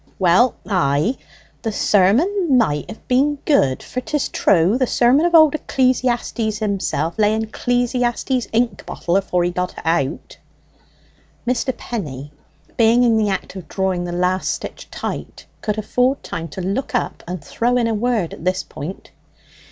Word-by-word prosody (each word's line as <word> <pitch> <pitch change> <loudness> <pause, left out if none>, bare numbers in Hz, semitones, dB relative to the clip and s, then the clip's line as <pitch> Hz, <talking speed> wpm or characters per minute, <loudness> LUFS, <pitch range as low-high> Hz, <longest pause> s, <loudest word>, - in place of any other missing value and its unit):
"Well 190 +7 +4
ay, 180 - +1 0.5
the 225 - -2
sermon 265 - +3
might 150 -11 +1
have - - -11
been 275 +4 +2
good; 140 - +2
for, 255 - -4
'tis 295 +2 -2
true, 180 +3 +3
the 255 - +2
sermon 260 +9 +3
of 345 - +1
Old 315 -3 +7
Eccl'iastes 250 -6 0
himself 200 -3 -2
lay 210 0 +3
in 220 0 -1
Eccl'iastes's 245 +2 -1
ink 235 +1 0
bottle 175 - -2
afore 180 -2 +1
he 175 - 0
got 180 0 -2
it - - -9
out." 160 -3 -1 1.1
Mr. 250 0 0
Penny, 145 - -6 0.5
being 230 +1 +5
in 235 -2 +4
the 215 -2 +2
act 190 0 -3
of 180 -5 -8
drawing 190 -1 -1
the 175 - -4
last 180 +1 0
stitch - - -7
tight, - - -6 0.2
could 210 0 -2
afford 250 +5 0
time 165 -1 -5
to 175 +5 -7
look 195 +9 -2
up - - -2
and 180 -1 -5
throw 245 +2 0
in 240 - +2
a 230 - 0
word 220 -5 0
at - - -10
this 185 +1 0
point. 155 +5 -8
220 Hz, 160 wpm, -20 LUFS, 180-245 Hz, 1.1 s, Old